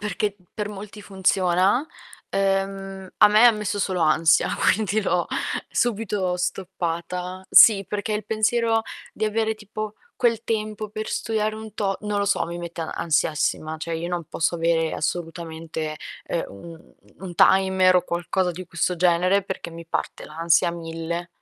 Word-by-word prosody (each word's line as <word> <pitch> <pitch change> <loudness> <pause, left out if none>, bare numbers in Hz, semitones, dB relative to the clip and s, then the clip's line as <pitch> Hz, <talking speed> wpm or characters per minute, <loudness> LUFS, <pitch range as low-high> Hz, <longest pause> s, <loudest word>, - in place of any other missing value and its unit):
perché 210 0 -2 0.2
per 210 -1 -3
molti 210 +1 -9
funziona, 190 - +2 0.4
ehm, 195 -1 -1
a 210 - +8
me 220 +3 +7
messo 210 -1 -3
solo 185 -2 -1
ansia, 160 0 +3 0.2
quindi 215 +1 0
l'ho 180 -4 0 0.4
subito 205 -6 0
stoppata 180 0 -3
sì, 200 -3 +8
perché 210 +1 -2
il 210 0 -3
pensiero 225 +1 +2 0.3
di - - -2
avere 220 +1 0
tipo 215 0 -6 0.2
quel 230 -2 +1
tempo 215 -1 -2
per 215 +1 -5
studiare 215 -1 -1
un 220 -1 -9
to 195 -2 -1
non 210 -1 -1
lo 200 - +1
so, 200 - +1
mi 170 +1 -5
mette 170 -1 -6
ansiassima 160 -1 0
cioè 165 +1 -4
io 170 +1 -4
non 175 -1 -3
posso 165 +3 -1
avere 165 -1 +1
assolutamente, 160 -2 -4 0.3
ehm, 170 - -2
u 165 +13 -10
u 165 +3 -18
un 175 -2 -6
timer 190 +1 +5
o 180 - +3
qualcosa 180 +1 -1
di 180 +1 -8
questo 175 +1 -1
genere, 180 +3 +3
perché 190 -3 -6
mi 165 0 -10
parte - - -3
l'ansia 165 +2 +2
a - - 0
mille. 170 +1 -5
190 Hz, 155 wpm, -24 LUFS, 170-210 Hz, 0.4 s, a